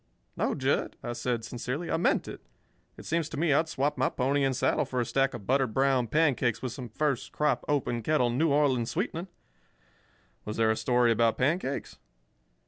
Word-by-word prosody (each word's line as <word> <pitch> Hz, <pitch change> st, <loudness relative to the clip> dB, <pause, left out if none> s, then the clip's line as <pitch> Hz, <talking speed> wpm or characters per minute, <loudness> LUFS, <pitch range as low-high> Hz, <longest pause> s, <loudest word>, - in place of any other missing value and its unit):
"No, -, -, 0 dB
Jud," -, -, 0 dB
I 120 Hz, -, -3 dB
said, 120 Hz, -2 st, -2 dB
sincerely, 125 Hz, +8 st, -4 dB
"I -, -, +2 dB
meant 170 Hz, -, +1 dB
it. -, -, -8 dB, 0.6 s
It -, -, -11 dB
seems 165 Hz, -1 st, -1 dB
to 155 Hz, -, -6 dB
me 155 Hz, -1 st, +2 dB
I'd 160 Hz, +3 st, +2 dB
swap 145 Hz, -1 st, -1 dB
my 130 Hz, -, +3 dB
pony 140 Hz, +2 st, 0 dB
and 135 Hz, -1 st, +1 dB
saddle -, -, +1 dB
for 125 Hz, -, -3 dB
a 120 Hz, -, +1 dB
stack 135 Hz, +1 st, +1 dB
of 105 Hz, -5 st, -9 dB
buttered 130 Hz, -2 st, +1 dB
brown 135 Hz, -2 st, +2 dB
pancakes 130 Hz, -4 st, +2 dB
with 130 Hz, -, -4 dB
some 125 Hz, 0 st, -7 dB
first 135 Hz, +2 st, -1 dB
crop, 150 Hz, -5 st, 0 dB
open 125 Hz, -5 st, 0 dB
kettle, 125 Hz, -1 st, +1 dB
New 155 Hz, +7 st, +2 dB
Orleans 135 Hz, -5 st, +2 dB
sweetening. 165 Hz, -, -3 dB, 1.2 s
Was 105 Hz, -, -5 dB
there 110 Hz, -1 st, +3 dB
a -, -, +1 dB
story 120 Hz, 0 st, +2 dB
about 115 Hz, 0 st, +2 dB
pancakes?" 140 Hz, +1 st, -1 dB
130 Hz, 190 wpm, -28 LUFS, 120-150 Hz, 1.2 s, my